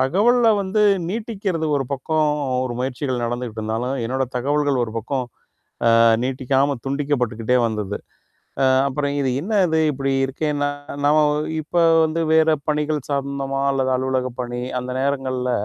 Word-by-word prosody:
தகவல்ல 225 - +3
வந்து 195 +3 0 0.3
நீட்டிக்கிறது 200 -6 -2
ஒரு 135 - -1
பக்கம் 155 +3 0 0.4
ஒரு 125 - -3
முயற்சிகள் 125 -1 -2
நடந்துக்கிட்டு 120 -2 -4
இருந்தாலும், 115 +5 -2
என்னோட 130 +3 -1
தகவல்கள் 140 0 +1
ஒரு 110 - -8
பக்கம் 130 +3 -2 0.7
அ, - - +5 0.2
நீட்டிக்காம 135 +1 0
துண்டிக்கப்பட்டுகிட்டே 125 -4 0
வந்தது. 105 -3 -3 0.7
அ, - - +4 0.2
அப்புறம் 140 +1 -2
இது 135 - 0
என்னது 185 -4 +1
இப்பிடி 135 0 -2
இருக்கேன்னா, 145 +1 -1 0.4
நாம 150 +1 +5 0.4
இப்ப 155 +3 -3 0.3
வந்து 160 +1 -1
வேற 160 0 +5 0.2
பணிகள் 150 0 0
சார்ந்தமா 140 -1 -2
அல்லது 130 -1 0
அலுவலகப் 130 -1 -2
பணி 120 0 -4 0.2
அந்த 125 0 -5
நேரங்கள்ல, 130 -2 -1
135 Hz, 130 wpm, -21 LUFS, 125-150 Hz, 0.7 s, அ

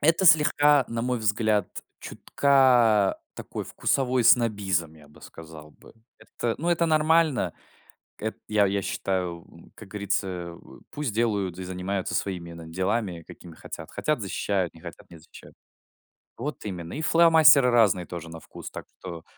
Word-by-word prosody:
Это 165 +5 +2
слегка, 150 -4 +5
на 115 0 -3
мой 125 0 -1
взгляд, 105 -2 0 0.3
чутка 125 -7 +2 0.2
такой - - -7
вкусовой 130 -3 0
снобизм, 100 -10 +2
я 75 -2 -18
бы 75 - -19
сказал 80 -2 -12
бы. - - -19 0.3
Это, 115 -1 -4
ну, 170 - -2
это 170 -1 +2
нормально. 155 - +2 0.7
Эт 110 +1 -4
я 105 -2 +2
я 100 +1 -1
считаю, 90 -3 -3
м, 85 - -18
как 110 - -13
говорится, 100 -1 -2
э, 85 -2 -7 0.3
пусть 145 -7 -4
делают 100 -5 -1
и 95 - -6
занимаются 95 +1 -4
своими, 90 -4 -3
на 85 -1 -10
делами, 95 +1 -2
какими 85 -2 -13
хотят. - - -9
Хотят- 150 -5 -2
защищают, 95 -2 -2
не 80 - -16
хотят- - - -12
не 85 - -13
защищают. 80 - -16 0.8
Вот 145 +6 -6
именно. 85 -4 -6
И 155 - -4
фломастеры 160 -5 +6
разные 105 -7 +3
тоже 85 -1 -8
на 80 0 -9
вкус. - - -11
Так - - -8
что 85 -3 -8
100 Hz, 155 wpm, -25 LUFS, 90-130 Hz, 0.8 s, фломастеры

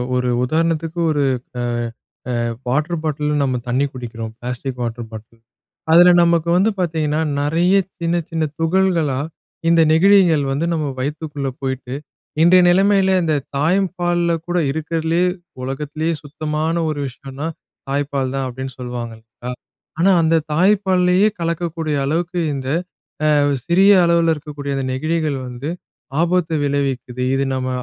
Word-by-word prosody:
ஒரு 125 0 0
உதாரணத்துக்கு 165 +3 0
ஒரு 145 -2 +1 0.4
அ - - -1 0.7
அ - - -1 0.3
வாட்டர் 150 +7 0
பாட்டில்ல 150 -1 -1
நம்ம 130 -2 +1
தண்ணீ 130 +3 +1
குடிக்கிறோம், 115 -3 -6
பிளாஸ்டிக் 125 +1 -5
வாட்டர் 120 0 -4
பாட்டில். 110 +1 -11 0.5
அதில 175 +2 +8
நமக்கு 170 -1 +2
வந்து 195 +4 +3
பாத்தீங்கன்னா, 155 -3 0 0.2
நெறைய 165 +6 +2 0.3
சின்ன 170 +1 +1
சின்ன 165 -1 -1 0.2
துகள்களா 165 -5 +1 0.5
இந்த 165 -1 +5
நெகிழிகள் 175 -3 +5
வந்து 145 +5 0
நம்ம 155 -2 -1
வயித்துக்குள்ள 145 0 -3
போயிட்டு, 130 -1 -4 0.5
இன்றைய 180 +1 +6
நிலைமையில 190 +1 +4
அந்த 160 -2 +1 0.2
தாய்பால்ல 175 +1 +1 0.2
கூட, 175 0 0
"இருக்கிறதுலயே 160 +3 0 0.4
உலகத்திலயே 150 +5 -2
சுத்தமான 155 +2 -2
ஒரு 150 -2 -3
விஷயம்னா, 135 +4 -7 0.4
தாய்ப்பால் 140 -2 -1
தான்" 135 -1 -1
அப்டின்னு 130 +1 -6
சொல்லுவாங்க 120 -2 -5
இல்லயா? 115 +2 -9 0.5
ஆனா 195 +3 +5
அந்த 165 0 +3 0.2
தாய்ப்பால்லயே 185 +1 +3
கலக்கக்கூடிய 165 -2 -2
அளவுக்கு 170 +5 -1 0.2
இந்த, 130 -1 -5 0.7
அ - - +4 0.3
சிறிய 190 +4 +5 0.2
அளவில 170 -1 +3
இருக்கக்கூடிய 145 -1 -5
இந்த 135 - -2
நெகிழிகள் 155 0 -1
வந்து, 125 +5 -5 0.5
ஆபத்தை 170 -1 +1
விளைவிக்குது. 135 -3 -2
"இது 135 +1 +1
நம்ம 130 0 -2
155 Hz, 125 wpm, -19 LUFS, 135-170 Hz, 0.7 s, அதில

